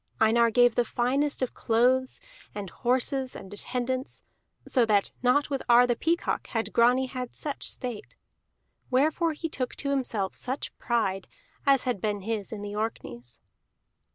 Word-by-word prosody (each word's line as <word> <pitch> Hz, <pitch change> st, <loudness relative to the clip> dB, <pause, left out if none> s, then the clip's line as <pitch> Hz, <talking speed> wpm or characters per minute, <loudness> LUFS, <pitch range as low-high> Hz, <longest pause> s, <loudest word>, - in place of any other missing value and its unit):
Einar 230 Hz, +1 st, +4 dB
gave 245 Hz, +1 st, +5 dB
the 245 Hz, -, +2 dB
finest 265 Hz, +5 st, 0 dB
of 255 Hz, -, -2 dB
clothes, 255 Hz, +3 st, +2 dB, 0.4 s
and 200 Hz, -4 st, -5 dB
horses, 255 Hz, +1 st, 0 dB
and 195 Hz, 0 st, -9 dB
attendants, 255 Hz, +4 st, -3 dB, 0.4 s
so 250 Hz, -, +3 dB
that 210 Hz, -3 st, +2 dB
not 275 Hz, +4 st, +2 dB
with 275 Hz, -, -1 dB
Ar 240 Hz, +1 st, +7 dB
the 240 Hz, -1 st, +1 dB
Peacock 335 Hz, +7 st, -1 dB
had 225 Hz, -1 st, -3 dB
Grani 245 Hz, +3 st, +4 dB
had 250 Hz, -1 st, -6 dB
such 290 Hz, -2 st, -4 dB
state. 245 Hz, -5 st, -4 dB, 0.7 s
Wherefore 310 Hz, +5 st, +2 dB
he 325 Hz, +2 st, -4 dB
took 255 Hz, -5 st, -4 dB
to 280 Hz, -, -2 dB
himself 230 Hz, -8 st, -1 dB
such 260 Hz, +3 st, -4 dB
pride 195 Hz, -5 st, 0 dB, 0.4 s
as 275 Hz, -2 st, +5 dB
had 245 Hz, -7 st, -2 dB
been 205 Hz, -2 st, -1 dB
his 215 Hz, 0 st, -3 dB
in 210 Hz, -2 st, -6 dB
the 205 Hz, 0 st, -5 dB
Orkneys. 120 Hz, -, -5 dB
245 Hz, 155 wpm, -27 LUFS, 220-260 Hz, 0.7 s, Ar